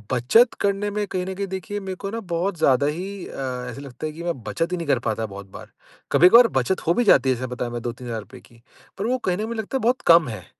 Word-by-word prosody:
बचत 225 - +4
करने 200 +1 0
में 210 0 -1
कहीं 185 -1 -3
न 190 - -4
कहीं 200 +1 -3
देखिए 190 +2 -5
मेरे 190 -2 -5
को 195 +1 -6
ना 230 - -3
बहुत 175 +2 -1
ज़्यादा 140 -3 +3
ही 185 +5 -4
अ, 125 -2 -5
ऐसे 125 +3 -8
लगता 140 +1 -8
है 155 - -3
कि 165 +2 -8
मैं 170 -7 -3
बचत 165 +9 -2
ही 180 - -1
नहीं 170 - -5
कर 130 - +2
पाता 110 0 -1
बहुत 100 -1 -9
बार, - - -11 0.4
कभी-कभार 230 +8 +7
बचत 160 +8 -2
हो 170 - +5
भी 245 - +1
जाती 185 - +5
है 130 - +3
जैसे 130 +2 -5
बताया 120 -1 -4
मैंने 120 0 -4
₹2-3,000 120 0 -6
की, 115 -1 -21 0.4
पर 195 - -3
वो 255 +2 +1
कहीं 185 -8 -1
न - - -7
कहीं 215 - -2
मुझे 230 0 -4
लगता 220 +5 -3
है - - -5
बहुत 245 +3 +1
कम 165 -3 +7
है, 110 -7 -7
170 Hz, 270 wpm, -23 LUFS, 125-200 Hz, 0.4 s, कभी-कभार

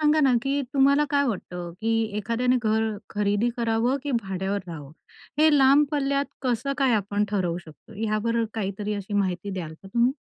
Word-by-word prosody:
सांगा 305 0 +4
ना, 270 -3 +4
की 275 +2 0
तुम्हाला 280 +2 +4
काय 285 -1 +3
वाटतं? 180 -6 -4
की 225 0 +1
एखाद्याने 235 +4 +1
घर 220 0 +2 0.3
खरेदी 205 +2 +1
करावं 235 +2 +1
की 290 - -3
भाड्यावर 195 +1 -2
राहावं? 150 -4 -8 0.5
हे 310 +1 +6
लांब 275 +2 +6
पल्ल्यात 280 -1 0 0.2
कसं 255 +2 0
काय 265 -3 +3
आपण 205 0 0
ठरवू 180 -4 0
शकतो? 155 -3 -15
हयावर 225 +2 0
काहीतरी 210 0 -3
अशी 200 +1 -5
माहिती 195 0 -1
द्याल 175 -5 -5
का 195 - -14
तुम्ही? 235 +5 +2
225 Hz, 170 wpm, -25 LUFS, 200-265 Hz, 0.5 s, हे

